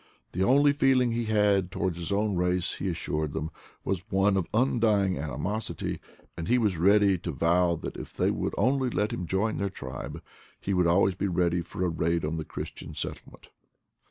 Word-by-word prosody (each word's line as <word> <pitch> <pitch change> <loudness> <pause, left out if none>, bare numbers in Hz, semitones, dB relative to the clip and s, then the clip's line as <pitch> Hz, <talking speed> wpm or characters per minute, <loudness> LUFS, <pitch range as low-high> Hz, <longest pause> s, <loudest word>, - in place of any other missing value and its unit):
The 95 - 0
only 140 +6 +5
feeling 130 -4 +3
he 115 0 -1
had 105 -4 +2
towards 95 -2 -1
his 85 +3 -4
own 105 0 +1
race, 90 0 0
he 95 - -1
as 85 - -2
sured 75 -3 -2
them, 80 +3 -3 0.3
was 95 -2 -1
one 95 0 +3
of 95 -3 0
undying 110 - +2
animosity; 75 +10 -3 0.4
and 85 -1 -5
he 125 - +4
was 105 -6 +1
ready 100 0 +4
to 85 - -4
vow 85 +4 +2
that - - -6
if - - -8
they - - +1
would - - -2
only 130 +4 +2
let 105 -2 -1
him 90 0 -4
join 100 +5 0
their 100 -1 -1
tribe 65 -8 -7 0.4
he 100 - -2
would 90 -2 +3
always 95 +3 +4
be 95 +2 -2
ready 85 -1 +1
for 90 +2 -3
a - - +2
raid 85 0 0
on 80 +2 -2
the 80 - -3
Christian - - -7
settlement. - - -7
95 Hz, 195 wpm, -28 LUFS, 85-105 Hz, 0.4 s, only